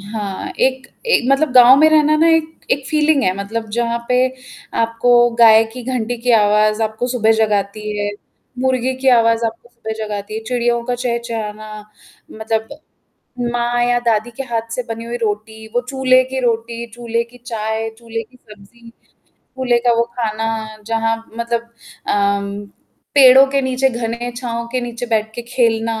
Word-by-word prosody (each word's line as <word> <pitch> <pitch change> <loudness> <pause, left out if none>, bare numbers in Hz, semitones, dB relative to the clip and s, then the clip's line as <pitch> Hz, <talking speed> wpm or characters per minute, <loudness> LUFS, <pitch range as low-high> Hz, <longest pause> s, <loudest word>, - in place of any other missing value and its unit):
हाँ, 200 -1 -5
एक 260 +1 +1 0.2
ए 470 - +4
मतलब 275 +2 +2
गाँव 250 +1 +8
में 310 +1 +6
रहना 305 -1 +4
ना 325 +2 +4
एक 320 0 -2
एक 275 -1 0
फीलिंग 305 -1 +2
है 185 - +2
मतलब 220 +3 -4
जहाँ 235 +1 -1
पे 250 - +2 0.7
आपको 230 +2 0 0.3
गाय 225 -1 +7
की 250 +1 -8
घंटी 245 -2 -2
की 250 - +1
आवाज़ 215 0 +3
आपको 220 +2 -2
सुबह 225 -3 +2
जगाती 210 -2 0 0.2
है। 205 0 -1 0.5
मुर्गे 260 0 0
की 265 - +2
आवाज़ 230 -2 +4
आपको 225 +1 -7
सुबह 235 -2 -7
जगाती 210 -1 -5
है, 220 - -3
चिड़ियों 240 0 0
का 245 - -1
चहचहाना 230 -3 -4 0.6
मतलब 220 0 -3 0.8
माँ 240 0 0
या 245 0 +2
दादी 235 -1 0
के 270 - -3
हाथ 230 -2 -3
से 250 - -3
बनी 225 0 -5
हुई 240 +1 -4
रोटी, 220 0 -4
वो 245 - +2
चूल्हे 255 -1 +3
की 260 +1 -4
रोटी, 235 0 -2
चूल्हे 235 -1 -2
की 235 +1 -18
चाय, 225 -2 -3
चूल्हे 230 -1 -5
की 250 +3 -23
सब्ज़ी। 220 +2 -17 0.5
चूल्हे 255 -2 -1
का 240 - +5
वो 230 - +3 0.2
खाना 225 -1 -2 0.2
जहाँ 225 0 0 0.2
मतलब 235 0 -1 0.5
अ, 200 0 -1 0.5
पेड़ों 265 -1 +8
के 275 0 +1
नीचे 260 0 +1
घने 235 0 -4
छाँव 235 -2 -4
के 255 - 0
नीचे 240 0 -5
बैठ 220 -1 -1
के 240 - -5
खेलना 225 -2 +1
235 Hz, 165 wpm, -18 LUFS, 220-250 Hz, 0.8 s, गाँव